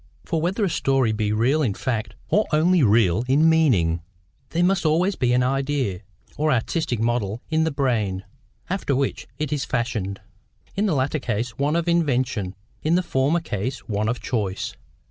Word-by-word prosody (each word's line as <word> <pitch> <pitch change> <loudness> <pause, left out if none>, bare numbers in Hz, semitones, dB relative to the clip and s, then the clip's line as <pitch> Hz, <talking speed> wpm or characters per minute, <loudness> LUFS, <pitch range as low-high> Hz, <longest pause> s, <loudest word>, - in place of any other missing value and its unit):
For 165 -3 -1
whether 190 +6 0
a - - 0
story 135 -6 +2
be 105 -1 -1
real 125 +8 +2
in 110 -9 0
fact, 110 -3 -3
or 210 - +2
only 170 +3 +4
real 110 -3 +4
in 145 +5 +4
meaning, 110 - +3 0.5
there 170 +1 +1
must 180 -1 +2
always 170 +5 +2
be 125 -2 +1
an 125 0 +3
idea, 135 -6 0 0.4
or 155 +1 +2
artistic 130 +1 0
model 115 -2 0
in 160 0 +2
the 160 - 0
brain, 115 -9 0 0.4
after 180 -7 -1
which 135 +1 -1
it 150 -1 -2
is 145 -1 -1
fashioned: 115 - -2 0.6
in 205 +2 +1
the 175 - +1
latter 135 +3 0
case 120 -1 -2
one 145 +3 +1
of 170 0 0
invention, 130 - 0 0.3
in 160 +2 +2
the 180 - +2
former 145 +3 +1
case 120 - -4
one 105 0 0
of 120 - -2
choice. 100 -6 -2
130 Hz, 175 wpm, -23 LUFS, 110-160 Hz, 0.6 s, only